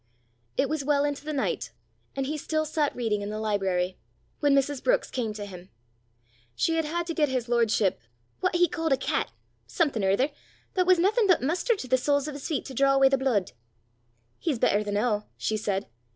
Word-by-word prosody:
It 280 - +3
was 310 -1 -2
well 285 0 +2
into 290 -1 -3
the 305 - -4
night, 280 -3 -2 0.4
and 270 -1 -1
he 300 +3 -2
still 310 +1 -1
sat 300 -1 0
reading 225 -4 -1
in 205 - -4
the 215 - -4
library, 190 -4 0 0.4
when 290 -2 +4
Mrs. 275 0 +1
Brookes - - +2
came 235 -4 -2
to 210 -1 -6
him. 185 -2 -11 0.9
She 330 - +1
had 325 - +1
had 340 +3 -2
to 335 - -3
get 300 -3 +2
his 255 -2 -1
lordship 225 -4 +2 0.4
"what 370 -1 0
he 350 0 +5
ca'd 325 -3 -2
a - - +2
cat - - -1 0.4
something 285 - 0
or 190 - +3
ither, 255 +10 +2 0.4
but 365 -1 +1
was 370 -1 +6
naething 410 +5 +3
but 365 -8 +4
mustard 360 - +1
to 260 - -6
the 260 - +3
soles 285 +2 +1
o' 300 - -5
's 285 - -6
feet 305 - -2
to 270 - -7
draw 275 +2 +3
awa' 270 0 +6
the 270 - +4
blude." 240 -9 +1 0.9
"He's 305 -7 -1
better 210 -1 +2
the 205 - -4
noo," 210 0 0
she 220 - -1
said. 200 -2 -1
275 Hz, 210 wpm, -27 LUFS, 215-310 Hz, 0.9 s, was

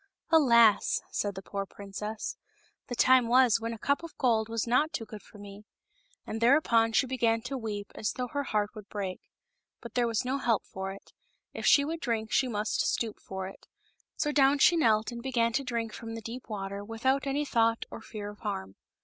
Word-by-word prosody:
" - - -54
Alas 235 -6 +5
!" - - -32
said 205 -1 -2
the 190 - -7
poor 200 +1 -4
princess, 205 +2 -6 0.3
" - - -38
the 245 - -4
time 255 0 +5
was 245 -1 +5
when 230 +1 -3
a 230 - -5
cup 280 +7 0
of 335 -2 -10
gold 225 -4 +2
was 230 -1 -1
not 255 +7 +2
too 225 - -4
good 215 -1 -10
for - - -17
me 205 0 -11 0.3
!" - - -37
And 225 - -5
thereupon 235 -3 +4
she 220 +4 +3
began 230 -3 +1
to 260 +2 -4
weep 210 -4 -5
as 210 - -2
though 250 - -3
her 285 +2 -2
heart 210 -3 0
would 215 -3 -11
break. 195 -3 -4 0.6
But 235 - -10
there 245 -1 +2
was 230 +1 -1
no 265 +2 -1
help 230 -5 +1
for 190 0 -5
it; 195 - -13 0.4
if - - -3
she 280 - +6
would 325 +2 -3
drink 225 -6 -2
she 265 - +3
must 210 -2 -1
stoop 225 -3 -1
for 190 0 -6
it; 195 - -13 0.5
so 295 - 0
down 280 -1 +4
she 340 +5 +5
knelt 225 -7 +2
and 235 0 -7
began 235 -3 0
to 275 - 0
drink 230 -3 -3
from 225 -1 -7
the 225 - -6
deep 240 +3 -8
water 200 -1 -4
without 260 +6 0
any 285 +2 0
thought 230 -3 +1
or - - -8
fear 210 -2 -7
of 205 - -16
harm. 95 +1 -5
230 Hz, 220 wpm, -29 LUFS, 210-255 Hz, 0.6 s, she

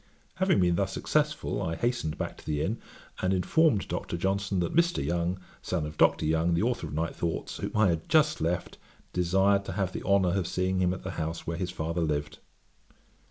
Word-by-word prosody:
Having 190 - +3
been 90 -1 +3
thus 95 0 0
successful, 150 -3 0
I 80 -4 -2
hastened 80 -7 -1
back - - -3
to - - -15
the 75 -1 0
inn, 110 +4 -2 0.4
and 95 - +1
informed 110 - +3
Dr. 85 - -3
Johnson 95 +1 0
that 85 - -2
'Mr. 170 - +2
Young, 85 +3 -1 0.2
son 85 -4 -2
of 75 0 -7
Dr. - - +3
Young, 80 +2 +2
the 85 - +1
authour 120 -8 0
of 75 - -6
Night 80 +2 -1
Thoughts, 85 -1 -3
whom - - -4
I 105 -3 +5
had 80 -1 -2
just 155 -1 +3
left, 85 +2 -2 0.3
desired 95 +3 +3
to 95 - -4
have 95 -1 -1
the - - -4
honour 100 -2 +3
of 90 - -2
seeing 95 0 0
him 90 -1 +3
at 90 - -5
the - - -4
house 80 +1 -4
where 85 0 -3
his 90 0 -2
father 85 -1 -2
lived.' 75 -2 -2
90 Hz, 205 wpm, -28 LUFS, 85-100 Hz, 0.4 s, I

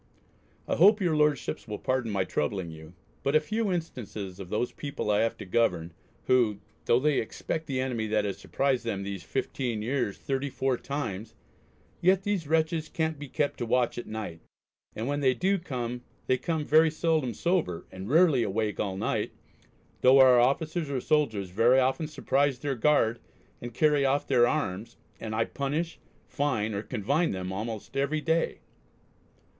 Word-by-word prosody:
I - - 0
hope 205 +6 +6
your 175 -5 +1
Lordships 150 -5 0
will 105 -1 -4
pardon 130 -1 -1
my 100 -2 +1
troubling 85 +1 -2
you, 80 +2 -12 0.3
but 140 +2 0
a - - +7
few 215 +6 -1
instances 110 - -5
of 95 -3 -8
those 110 +4 -1
people 140 -7 -3
I 105 - +3
have 115 0 0
to 105 - -8
govern, 90 -5 0 0.3
who, 120 -6 +2 0.3
though 120 - +4
they 150 +1 +2
expect 155 +7 -4
the 135 -3 -2
enemy 125 -4 -1
that 105 -1 +1
has 100 - -3
surprised 135 -2 0
them 100 -4 -3
these 100 -2 -5
fifteen 115 +5 -3
years 120 -4 -1
thirty 135 +1 -2
four 130 0 0
times, 115 -6 -5 0.7
yet 185 +2 +4
these 195 -7 -1
wre(t)ches 160 0 0
can't 160 -2 -1
be 145 - -7
kept 145 +2 -1
to 120 - -1
watch 120 0 +1
at - - -8
night, 110 -7 -5 0.6
and 110 - -3
when 145 +1 -1
they 130 -3 +3
do 195 +2 +1 0.7
they 130 - +2
come 160 -3 -2
very 160 +2 +5
seldom 155 -6 0
sober, 170 - 0
and 95 +3 -7
rarely 155 -3 +5
awake 110 0 -1
all 95 -2 -2
night, - - -1 0.7
though 130 +2 +7
our 130 -2 +7
officers 155 +5 +1
or 135 -2 -1
soldiers 120 - 0
very 115 +7 +4
often 135 +5 +1
surprise 140 -3 +1
their 140 +2 -2
guard 120 -3 +2 0.4
and 120 -1 -7
carry 150 -2 +3
off 140 +1 +1
their 120 -3 +4
arms, 115 -8 -2 0.2
and 110 -1 -4
I 115 - +2
punish, 150 +5 -3 0.3
fine, 120 -8 -1
or 100 - -2
confine 135 - 0
them 95 0 -4
almost 110 +4 -5
every 140 +3 0
day. 165 +1 0
130 Hz, 170 wpm, -28 LUFS, 110-150 Hz, 0.7 s, a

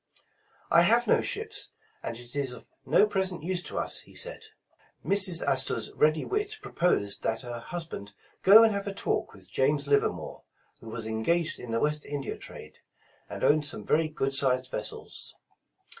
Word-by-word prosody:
''I 170 - +7
have 230 +7 +4
no - - +3
ships, 435 -1 -3 0.3
and 115 - -5
it 120 +2 -10
is 140 -3 -1
of 125 - -13 0.2
no - - +5
present 190 -5 -1
use 180 +1 -1
to - - -7
us,'* - - 0
he - - -12
said. - - -3 0.6
Mrs. 190 -4 +5
Astor 135 -3 +2
's 110 - -3
ready 155 +1 +2
wit 420 +1 -2
proposed 170 - 0
that 110 - -1
her 120 -2 -6
husband 160 - -7 0.3
go 210 +4 +9
and 225 -1 +4
have 200 0 -3
a 200 - -3
talk - - -1
with 95 -2 -13
James 140 +5 +1
Livermore, 140 0 0 0.4
who 115 - -11
was 115 0 -5
en 110 0 -3
gaged 170 +6 +1
in 125 - -8
the 115 - +1
West 150 +2 0
India 145 -1 -4
trade, - - -11 0.5
and - - -6
owned 150 0 +4
some 105 -8 -3
very 160 +1 +2
good 135 -3 -2
sized 130 -2 +1
vessels. 105 - -4
150 Hz, 180 wpm, -28 LUFS, 120-190 Hz, 0.6 s, go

